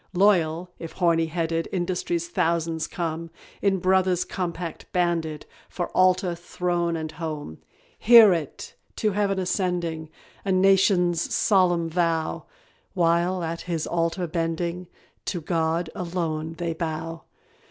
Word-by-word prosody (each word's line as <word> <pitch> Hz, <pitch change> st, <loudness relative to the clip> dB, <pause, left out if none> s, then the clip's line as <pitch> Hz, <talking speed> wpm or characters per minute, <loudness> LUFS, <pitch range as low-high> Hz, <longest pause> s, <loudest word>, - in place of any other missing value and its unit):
Loyal, 175 Hz, -3 st, +2 dB
if 165 Hz, -, -7 dB
"horny 165 Hz, -2 st, +2 dB
handed," 165 Hz, 0 st, -1 dB
Industry's 175 Hz, -2 st, -1 dB
thousands 165 Hz, -1 st, 0 dB
come; 165 Hz, -1 st, -4 dB, 0.3 s
In 195 Hz, -1 st, +2 dB
brother's 185 Hz, 0 st, +2 dB
compact 170 Hz, -2 st, -5 dB
banded 165 Hz, -4 st, -1 dB, 0.2 s
For 175 Hz, -, -4 dB
Altar, 185 Hz, -1 st, +3 dB
Throne, 175 Hz, 0 st, -2 dB
and 160 Hz, -1 st, -4 dB
Home. 155 Hz, -, -6 dB, 0.4 s
Hear 225 Hz, -4 st, +8 dB
it! 160 Hz, -5 st, -5 dB, 0.2 s
to 215 Hz, -, 0 dB
Heaven 200 Hz, -1 st, 0 dB
ascending, 180 Hz, -4 st, -1 dB, 0.3 s
A 195 Hz, -, -1 dB
nation's 185 Hz, -2 st, +4 dB
solemn 180 Hz, -4 st, +3 dB
vow; 165 Hz, -1 st, -1 dB, 0.5 s
While, 175 Hz, +1 st, +2 dB
at 165 Hz, 0 st, -3 dB
His 170 Hz, -3 st, -3 dB
altar 170 Hz, +1 st, -1 dB
bending, 170 Hz, +2 st, -2 dB, 0.4 s
To 180 Hz, -, -2 dB
God 165 Hz, 0 st, -1 dB
alone 165 Hz, -3 st, -3 dB
they 170 Hz, -1 st, -2 dB
bow. 160 Hz, 0 st, -5 dB
170 Hz, 120 wpm, -25 LUFS, 165-180 Hz, 0.5 s, Hear